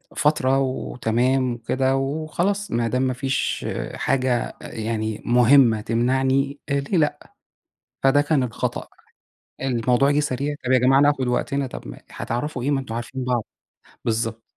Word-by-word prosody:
فترة 135 Hz, -3 st, +2 dB
وتمام 130 Hz, -1 st, 0 dB
وكده 130 Hz, +3 st, 0 dB
وخلاص 160 Hz, +8 st, -1 dB
ما 115 Hz, 0 st, +1 dB
دام 125 Hz, +2 st, 0 dB
ما 130 Hz, -1 st, +1 dB
فيش 135 Hz, +1 st, -2 dB, 0.3 s
حاجة 130 Hz, -2 st, 0 dB
يعني 110 Hz, -1 st, -3 dB
مهمة 120 Hz, -1 st, +5 dB
تمنعني، 130 Hz, +4 st, +1 dB
ليه 140 Hz, +6 st, 0 dB
لأ، 150 Hz, -2 st, +1 dB, 0.8 s
فده 135 Hz, +2 st, +5 dB
كان 145 Hz, -2 st, +1 dB
الخطأ. 120 Hz, -4 st, -3 dB, 0.8 s
الموضوع 125 Hz, +1 st, +2 dB
جِه 145 Hz, -, +2 dB
سريع، 145 Hz, +1 st, -1 dB
طَب 125 Hz, -, 0 dB
يا 130 Hz, -, +6 dB
جماعة 130 Hz, +2 st, +4 dB
ناخد 145 Hz, -3 st, +2 dB
وقتنا، 135 Hz, +3 st, -1 dB
طَب -, -, -9 dB
ما -, -, -9 dB
هتعرَفوا 125 Hz, +2 st, -4 dB
إيه؟ 140 Hz, -, 0 dB
ما 140 Hz, -, +2 dB
أنتم 115 Hz, -4 st, -6 dB
عارفين 125 Hz, +3 st, -4 dB
بعض. 125 Hz, -2 st, 0 dB, 0.6 s
بالضبط، 115 Hz, 0 st, -1 dB
130 Hz, 140 wpm, -23 LUFS, 120-140 Hz, 0.8 s, يا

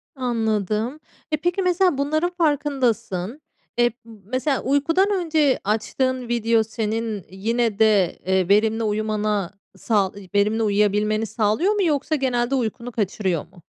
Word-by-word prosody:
Anladım. 225 Hz, +1 st, -1 dB, 0.3 s
E, 305 Hz, -, +2 dB
peki, 350 Hz, +4 st, -1 dB
mesela, 360 Hz, -3 st, +2 dB
bunların 310 Hz, +5 st, 0 dB
farkındasın, 260 Hz, -, 0 dB, 0.4 s
eee, 240 Hz, 0 st, +3 dB
mesela, 250 Hz, +6 st, -2 dB
uykudan 330 Hz, +9 st, +2 dB
önce 315 Hz, -7 st, +2 dB
açtığın 250 Hz, +4 st, -1 dB
video 230 Hz, -1 st, +2 dB
senin 220 Hz, -2 st, -3 dB
yine 220 Hz, +3 st, -1 dB
de, 210 Hz, -5 st, +3 dB
eee, 190 Hz, 0 st, +1 dB
verimli 220 Hz, +2 st, +3 dB
uyumana, 210 Hz, -2 st, -1 dB, 0.3 s
sağ 200 Hz, -5 st, +1 dB, 0.2 s
verimli 210 Hz, +3 st, +2 dB
uyuyabilmeni 210 Hz, +1 st, +1 dB
sağlıyor 220 Hz, -, +1 dB
mu 410 Hz, -2 st, +1 dB
yoksa 305 Hz, -1 st, +1 dB
genelde 255 Hz, -1 st, 0 dB
uykunu 240 Hz, 0 st, -3 dB
kaçırıyor 190 Hz, -6 st, -1 dB
mu? 175 Hz, 0 st, -20 dB
230 Hz, 120 wpm, -22 LUFS, 210-275 Hz, 0.4 s, eee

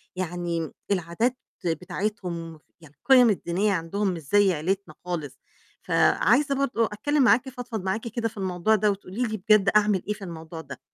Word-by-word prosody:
يعني 175 Hz, -2 st, -3 dB, 0.2 s
العادات 195 Hz, +8 st, 0 dB, 0.3 s
بتاعتهم، 175 Hz, -2 st, -3 dB, 0.2 s
يعني 150 Hz, -2 st, -17 dB
القِيَم 255 Hz, -3 st, +5 dB
الدينية 195 Hz, +1 st, 0 dB
عندهم 190 Hz, +4 st, -1 dB
مش 165 Hz, -, -6 dB
زَي 195 Hz, +6 st, +3 dB
عيلتنا 175 Hz, +1 st, -2 dB
خالص، 160 Hz, -6 st, -4 dB, 0.4 s
فعايزة 275 Hz, +5 st, +3 dB
برضه 265 Hz, -4 st, +1 dB
أتكلّم 275 Hz, +8 st, 0 dB
معاكِ، 250 Hz, +2 st, +4 dB
أفضفض 245 Hz, -5 st, -6 dB
معاكِ 220 Hz, +5 st, -2 dB
كده 230 Hz, 0 st, -2 dB
في 220 Hz, -, -18 dB
الموضوع 190 Hz, +2 st, +1 dB
ده، 210 Hz, 0 st, +2 dB
وتقولي 200 Hz, +3 st, -4 dB
لي 220 Hz, -2 st, -2 dB
بجد 205 Hz, -1 st, +4 dB
أعمل 205 Hz, -3 st, +2 dB
إيه 210 Hz, -, 0 dB
في 210 Hz, -, -12 dB
الموضوع 165 Hz, -2 st, -8 dB
ده. 140 Hz, -2 st, -10 dB
200 Hz, 160 wpm, -25 LUFS, 170-220 Hz, 0.4 s, القِيَم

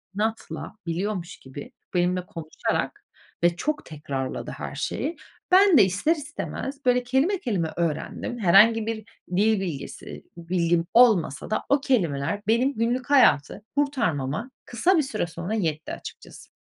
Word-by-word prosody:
inatla 220 Hz, +1 st, -3 dB
biliyormuş 180 Hz, +1 st, -3 dB
gibi, 175 Hz, -, -10 dB, 0.2 s
benimle 180 Hz, 0 st, +1 dB
konuşarak 160 Hz, -3 st, -3 dB, 0.4 s
ve 175 Hz, 0 st, +4 dB
çok 300 Hz, -, -2 dB
tekrarladı 140 Hz, -4 st, -5 dB
her -, -, -7 dB
şeyi. 330 Hz, -, -3 dB, 0.4 s
Ben 380 Hz, -3 st, +7 dB
de 205 Hz, -, +8 dB
ister 200 Hz, -, +1 dB
istemez 285 Hz, -2 st, -6 dB
böyle 250 Hz, 0 st, +3 dB
kelime, 270 Hz, +10 st, +1 dB
kelime 195 Hz, -, -2 dB
öğrendim. 170 Hz, +8 st, -2 dB
Herhangi 215 Hz, +4 st, +6 dB
bir 225 Hz, -, -1 dB, 0.4 s
dil 215 Hz, 0 st, +3 dB
bilgisi, 155 Hz, -7 st, -6 dB
bilgim 170 Hz, 0 st, 0 dB
olmasa 210 Hz, -, +4 dB
da 215 Hz, -, -1 dB
o 280 Hz, 0 st, +3 dB
kelimeler 190 Hz, -, 0 dB
benim 245 Hz, +5 st, +3 dB
günlük 245 Hz, +4 st, -1 dB
hayatı 210 Hz, -, +4 dB
kurtarmama 230 Hz, -, -1 dB
kısa 345 Hz, -, +2 dB
bir 310 Hz, -, +3 dB
süre 265 Hz, -10 st, -2 dB
sonra 175 Hz, +5 st, -5 dB
yetti 160 Hz, -8 st, -2 dB
açıkçası. -, -, -10 dB
215 Hz, 135 wpm, -25 LUFS, 170-255 Hz, 0.4 s, de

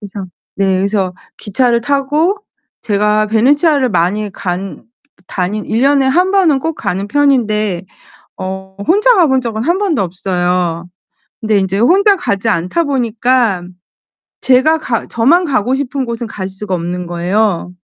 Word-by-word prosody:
그래서 200 Hz, -2 st, -7 dB, 0.3 s
네 195 Hz, -1 st, +1 dB
그래서 195 Hz, -2 st, 0 dB, 0.2 s
기차를 235 Hz, +3 st, +1 dB
타고 285 Hz, -, +1 dB, 0.5 s
제가 210 Hz, -1 st, +1 dB
베네치아를 275 Hz, +5 st, +3 dB
많이 205 Hz, +3 st, 0 dB
간 190 Hz, +1 st, -5 dB, 0.4 s
다니 190 Hz, +4 st, -2 dB
1 225 Hz, +2 st, -1 dB
년에 275 Hz, -1 st, +3 dB
1 360 Hz, +8 st, +2 dB
번은 360 Hz, -8 st, +3 dB
꼭 320 Hz, +4 st, -3 dB
가는 195 Hz, -5 st, -3 dB
편인데 215 Hz, -9 st, +1 dB, 0.6 s
어 190 Hz, 0 st, -6 dB
혼자 425 Hz, +8 st, +4 dB
가본 275 Hz, -9 st, +3 dB
적은 225 Hz, -2 st, -3 dB
1 345 Hz, +5 st, +1 dB
번도 380 Hz, -, 0 dB
없어요. 180 Hz, -2 st, -1 dB, 0.6 s
근데 215 Hz, -2 st, +1 dB
인제 195 Hz, 0 st, -1 dB
혼자 390 Hz, -, +4 dB
가지 200 Hz, -, -2 dB
않다 185 Hz, -, 0 dB
보니까 240 Hz, -6 st, +1 dB, 0.8 s
제가 265 Hz, +5 st, +4 dB
가 240 Hz, -7 st, -2 dB
저만 285 Hz, +11 st, +3 dB
가고 255 Hz, -3 st, 0 dB
싶은 270 Hz, -1 st, -3 dB
곳은 235 Hz, 0 st, -4 dB
갈 190 Hz, -4 st, -5 dB
수가 190 Hz, 0 st, -4 dB
없는 175 Hz, +1 st, -4 dB
거예요. 180 Hz, +2 st, -1 dB
220 Hz, 260 characters per minute, -14 LUFS, 190-275 Hz, 0.8 s, 혼자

